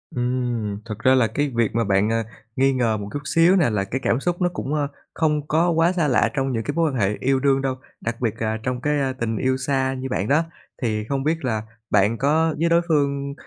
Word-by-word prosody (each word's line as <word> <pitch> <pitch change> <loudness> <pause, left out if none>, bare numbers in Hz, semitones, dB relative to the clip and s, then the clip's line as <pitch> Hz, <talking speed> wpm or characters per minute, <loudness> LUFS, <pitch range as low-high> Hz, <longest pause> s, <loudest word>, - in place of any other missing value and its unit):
Ừm, 120 -4 -1
thực 105 -2 -6
ra 130 +3 +4
là 125 -3 +4
cái 145 +7 -1
việc 115 -2 +1
mà 115 - +2
bạn, 100 0 +2
à, 115 0 +1 0.3
nghi 135 +1 +3
ngờ 120 -4 +1
một 100 -1 -6
chút 145 - -2
xíu 165 +5 +4
nè 175 -9 +3
là 105 -3 0
cái 125 +7 -4
cảm 115 - +2
xúc 175 +4 -2
nó 175 - +3
cũng, 140 - -4
a, 145 -2 0 0.3
không 150 -2 0
có 165 +3 +2
quá 165 +1 +3
xa 170 -4 +1
lạ 120 -3 +3
trong 135 0 -1
những 115 -1 -1
cái 145 - -3
mối 165 -2 +2
quan - - -5
hệ 100 0 +1
yêu 135 0 +1
đương 135 0 +2
đâu, 135 -1 -1 0.3
đặc 115 +1 -4
biệt 115 -4 0
là 110 0 0
trong 125 0 -2
cái, 150 +1 +1
a, 135 -1 0
tình 115 -3 -3
yêu 130 +2 +1
xa 130 0 0
như 130 0 -5
bạn 100 -5 -1
đó. 150 +6 +3 0.4
Thì 110 -3 -1
không 135 +4 -2
biết 160 0 -1
là 110 -4 0 0.3
bạn 105 +3 +3
có 155 +4 +2
với 170 +1 +2
đối 170 0 +4
phương 140 -3 0
130 Hz, 255 wpm, -22 LUFS, 115-150 Hz, 0.4 s, ra